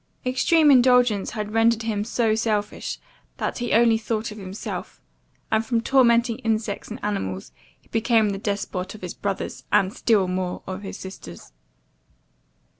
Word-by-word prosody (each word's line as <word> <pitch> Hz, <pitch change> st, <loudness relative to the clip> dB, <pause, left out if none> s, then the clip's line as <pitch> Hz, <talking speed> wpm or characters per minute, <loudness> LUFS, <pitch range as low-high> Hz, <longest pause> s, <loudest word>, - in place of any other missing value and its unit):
Extreme 295 Hz, +4 st, +4 dB
indulgence 250 Hz, -5 st, +4 dB
had 210 Hz, 0 st, -4 dB
rendered 225 Hz, 0 st, +3 dB
him 215 Hz, -2 st, -1 dB
so 225 Hz, 0 st, +1 dB
selfish, 215 Hz, -2 st, -1 dB, 0.4 s
that -, -, -3 dB
he 240 Hz, -1 st, -2 dB
only 225 Hz, 0 st, +4 dB
thought 220 Hz, 0 st, -2 dB
of 210 Hz, -, -9 dB
himself; 190 Hz, +1 st, -6 dB, 0.5 s
and 220 Hz, 0 st, +2 dB
from 230 Hz, 0 st, 0 dB
tormenting 235 Hz, -2 st, +3 dB
insects 220 Hz, -2 st, -2 dB
and 225 Hz, +3 st, -7 dB
animals, 95 Hz, -, -3 dB, 0.3 s
he -, -, -30 dB
became 225 Hz, -1 st, +2 dB
the 195 Hz, -1 st, -3 dB
despot 200 Hz, -2 st, -3 dB
of 215 Hz, -, -12 dB
his 180 Hz, -2 st, -5 dB
brothers, 200 Hz, -1 st, -4 dB
and 200 Hz, -1 st, +3 dB
still 215 Hz, -6 st, +2 dB
more 180 Hz, 0 st, -3 dB
of 190 Hz, +1 st, -5 dB
his 195 Hz, -, -7 dB
sisters. 90 Hz, -, -10 dB
215 Hz, 150 wpm, -24 LUFS, 200-230 Hz, 0.5 s, Extreme